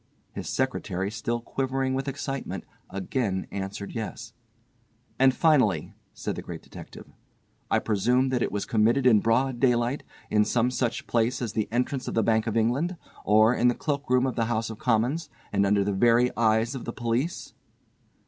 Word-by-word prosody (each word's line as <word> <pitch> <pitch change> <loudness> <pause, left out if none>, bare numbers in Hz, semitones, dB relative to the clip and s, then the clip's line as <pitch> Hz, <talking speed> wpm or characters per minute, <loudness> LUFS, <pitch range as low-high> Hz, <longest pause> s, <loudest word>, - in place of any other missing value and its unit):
His - - -6
secretary, 95 +3 -1
still 115 +2 -2
quivering 130 +1 -1
with 135 +1 -2
excitement, 135 0 -4 0.3
again 95 0 -2
answered 100 +1 -5
yes. 110 -3 -6 0.9
"And 135 0 +6
finally," 130 - +2 0.2
said - - -4
the - - -5
Great - - -8
Detective, - - -11 0.6
"I - - +3
presume 125 +6 +2
that 125 -2 0
it - - 0
was 105 0 -2
committed 115 +4 +2
in 115 -4 +6
broad 120 +3 +1
daylight, 120 +1 +2 0.3
in 105 0 +4
some 120 +3 +1
such 120 -2 -2
place 120 +2 +1
as 120 -4 -3
the 110 -2 -1
entrance 125 +2 -1
of - - -3
the 115 - +3
Bank 110 0 +2
of 115 0 0
England, 135 +11 +1 0.3
or 110 +3 +5
in 125 - +2
the 120 - +3
cloak 145 -2 -3
room 125 0 +3
of 130 - -2
the 115 - +1
House 115 -1 -1
of 110 - -9
Commons, 125 +7 0 0.2
and 100 0 +3
under 100 0 +3
the 100 0 -1
very 120 +4 +3
eyes 110 +1 +2
of 130 - -6
the 120 - -4
police?" 120 +8 -2
120 Hz, 175 wpm, -26 LUFS, 110-130 Hz, 0.9 s, And